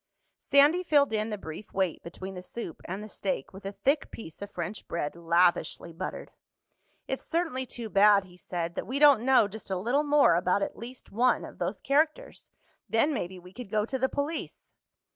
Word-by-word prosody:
Sandy 290 +6 +4
filled 290 -8 +3
in 215 +1 0
the 210 - -3
brief 160 +2 -9
wait 190 -4 0
between 185 +3 -8
the 180 - -7
soup 180 -2 -7
and 190 +4 -5
the - - -7
steak 195 -8 -3
with 195 +1 -8
a - - -3
thick 275 +8 0
piece 165 -7 -10
of 200 - -6
French 180 +2 -6
bread, 155 -3 -3
lavishly 170 0 +1
buttered. 180 +3 -6 0.8
"It's 265 - -3
certainly 320 -7 -1
too 235 -2 -6
bad," 200 -1 +5
he 180 -2 -16
said, 170 -1 -4
"that - - -5
we 260 +5 -2
don't 285 -5 +7
know 255 -4 +5
just 210 0 -8
a 190 - -1
little 240 +10 +1
more 295 - +5
about 180 +3 +2
at - - -4
least 245 +3 -10
one 245 +4 +2
of - - -12
those 180 +3 -2
characters. 305 +3 0 0.4
Then 230 +7 +2
maybe 185 -7 -4
we 180 +1 -14
could 240 -1 -8
go 210 0 +1
to 265 +3 -3
the 265 +1 +1
police." 295 +3 -4
210 Hz, 200 wpm, -28 LUFS, 180-265 Hz, 0.8 s, don't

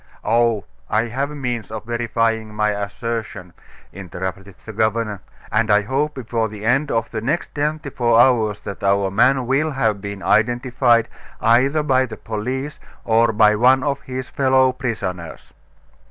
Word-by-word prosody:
"Oh! 115 -3 +2 0.2
I 110 +1 +2
have 135 +5 -2
means 125 -6 -4
of 110 0 -7
verifying 115 -2 -1
my 105 0 +1
assertion," 105 -2 -5 0.4
interrupted 95 +1 -6
the 110 - -8
governor; 110 -2 -1 0.3
"and 110 +1 +1
I 105 0 +4
hope 140 +7 -1
before 115 -3 -2
the 105 0 -8
end 135 +6 +2
of 115 -3 -1
the 110 - -3
next 140 +9 -2
twenty 150 0 -2
four 120 -2 +2
hours 115 -5 +3
that 100 - -8
our 100 0 +2
man 130 +5 +3
will 135 +5 +1
have 110 -8 0
been 100 -1 -6
identified, 120 +1 +2 0.3
either 130 +7 +3
by 130 -3 +2
the 110 -2 -8
police 130 +7 -4 0.3
or 115 0 +3
by 105 -1 +4
one 130 +4 +4
of 140 0 -1
his 130 -1 -6
fellow 130 -1 +3
prisoners." 95 -10 -5
115 Hz, 155 wpm, -20 LUFS, 105-130 Hz, 0.4 s, I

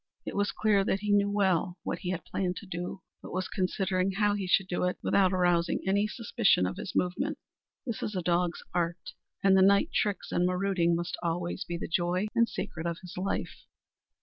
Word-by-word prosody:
It - - -5
was 205 0 +1
clear 210 -2 +2
that 195 0 0
he 210 -1 -1
knew 205 0 +4
well 190 -3 +1
what - - -3
he 180 - -4
had 180 -3 -3
planned 180 -2 -2
to 210 - -8
do, 180 +1 -5 0.2
but - - -9
was 185 +1 -2
considering 185 0 0
how 205 +1 +2
he 200 -2 -2
should 185 +1 +3
do 180 - -1
it 180 - -1
without 190 -2 +3
arousing 175 -2 +2
any 200 +2 +2
suspicion 215 - +2
of 90 - -3
his 180 - -6
movements. 275 - 0 0.5
This 235 -4 -4
is 210 - -3
a 180 - -1
dog's 175 0 0
art, 170 -1 -2 0.3
and 195 -1 +6
the 190 - +6
night 200 +1 +4
tricks 205 -2 -1
and 175 +1 +2
marauding 180 -2 +1
must 175 +1 -3
always 175 0 -2
be 175 0 -4
the - - -5
joy 175 +3 0
and 230 0 +3
secret 160 0 -4
of 170 -1 -2
his 180 - -9
life! 190 +2 -3
185 Hz, 205 wpm, -29 LUFS, 175-200 Hz, 0.5 s, and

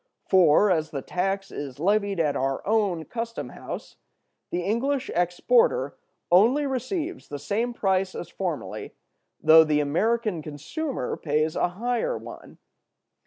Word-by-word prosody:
For, 185 +2 +5
as 160 -3 +1
the 140 -4 -5
tax 195 +2 -2
is 140 -2 -6
levied 200 +2 +1
at 150 -3 +1
our 135 0 -1
own 200 -7 +1
custom 230 -1 -5
house, - - -8 0.5
the 175 - -2
English 260 +7 -1
exporter 465 - +2 0.4
only 235 +11 +5
receives 290 - -3
the 145 - -5
same 210 - -1
price 190 -4 0
as 175 - -5
formerly, 150 - -5 0.5
though 160 0 +8
the 155 -1 +1
American 210 - 0
consumer 160 - -4
pays 155 +1 0
a - - +2
higher 240 - -1
one. - - -11
190 Hz, 130 wpm, -25 LUFS, 155-235 Hz, 0.5 s, though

